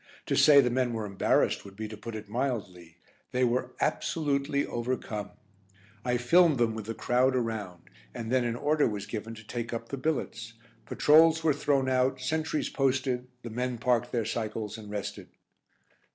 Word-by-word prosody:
To - - 0
say 145 -2 +7
the 125 -2 0
men 125 -1 0
were 110 -2 -3
embarrassed 100 -1 +1
would 100 -1 -12
be 110 +1 -5
to 110 - -8
put 110 +2 -8
it 110 -1 -7
mildly. 100 -9 -4 0.3
They 125 0 +1
were 125 +1 0
absolutely 140 -2 0
overcome. 120 -3 -3 0.7
I 125 0 +1
filmed 160 +5 +4
them 115 -2 +2
with 110 -1 -6
the 115 - -4
crowd 130 +3 +2
around. 110 -8 -3 0.3
And 115 -1 -6
then 130 -1 +3
an 120 -1 -1
order 150 +4 +2
was 105 -3 -4
given 115 0 -6
to 110 -1 -13
take 120 +1 -4
up 115 -1 -5
billets. 115 -6 -2 0.3
Patrols 160 +2 +5
were 155 -2 +4
thrown 140 -1 +1
out, 130 0 +1
sentries 155 +4 -1
posted, 130 -2 0 0.2
the 120 - -6
men 125 +1 -2
parked 120 +1 +1
their 115 -3 0
cycles 110 -2 -3
and 110 -2 -10
rested. 105 -1 -5
120 Hz, 170 wpm, -29 LUFS, 110-130 Hz, 0.7 s, say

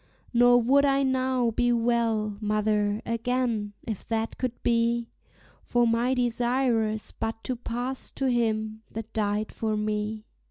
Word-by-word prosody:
Nor 245 0 +6
would 275 +4 +4
I 275 -1 +3
now 260 -2 +1
be 245 +2 +1
well, 230 -3 +1
mother, 210 0 0
again, 230 -3 -1
if 220 -5 -5
that 225 0 -2
could 250 -2 -3
be; 235 0 +1 0.5
For 240 0 +2
my 235 +3 +2
desire 245 -1 +1
is 215 0 -4
but 225 0 -4
to 255 - -2
pass 245 +2 -4
to 270 - -2
Him 220 -3 0
that 225 0 -6
died 210 -1 -1
for 215 -1 -2
me. 210 0 -2
230 Hz, 145 wpm, -27 LUFS, 215-245 Hz, 0.5 s, Nor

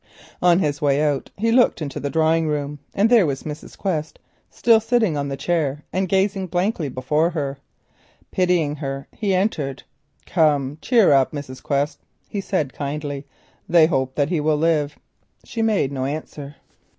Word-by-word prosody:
On 175 -1 +5
his 145 -5 0
way 140 -1 +2
out 145 -3 0
he 225 +3 +1
looked 245 -5 +4
into 145 -4 -4
the 140 - -3
drawing 160 +1 +2
room 145 -1 -2 0.2
and 200 +3 +4
there 225 -7 +5
was 135 -2 -3
Mrs. 150 -1 -8
Quest, 160 -6 -2 0.3
still 230 -2 +4
sitting 225 -6 +1
on 140 -1 -2
the 135 -1 -4
chair 150 -2 -1
and 185 +1 0
gazing 195 0 +1
blankly 175 -3 -1
before 150 +6 +1
her. 140 -5 -3 0.7
Pitying 175 -5 +1
her 135 -1 -5
he 200 -3 -1
entered. 155 -9 -1 0.4
"Come, 150 -3 +1
cheer 230 - +4
up, 135 +1 +3
Mrs. 140 -3 -7
Quest," 140 +1 -1 0.3
he 200 - -4
said 155 -9 -1
kindly, 145 -1 -4 0.4
"they 170 -2 +6
hope 130 -5 -1
that 145 0 +1
he 175 - 0
will 150 0 +1
live." 150 -2 +1 0.5
She 230 - -4
made 210 -11 +1
no 130 -2 -2
answer. 145 0 -6
155 Hz, 165 wpm, -22 LUFS, 140-185 Hz, 0.7 s, they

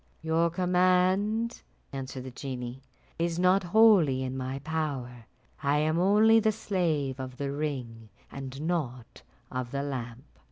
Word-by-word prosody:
"Your 165 +1 +2
command," 185 +5 +2 0.3
answered 135 -1 -5
the 130 - -7
genie, 125 -1 -6 0.4
"is 170 0 0
not 185 +2 +4
wholly 180 -9 +5
in 130 0 -4
my 130 +1 -3
power; 135 -7 -4 0.3
I 140 0 +2
am 155 +2 +1
only 215 +4 +5
the 220 0 +2
slave 165 - -1
of 130 -1 -6
the 140 -1 -3
ring, 125 -7 -4 0.2
and 135 -1 -7
not 140 -8 -3 0.3
of 130 -1 -3
the 140 +2 -3
lamp." 125 -3 -5
145 Hz, 135 wpm, -28 LUFS, 130-180 Hz, 0.4 s, wholly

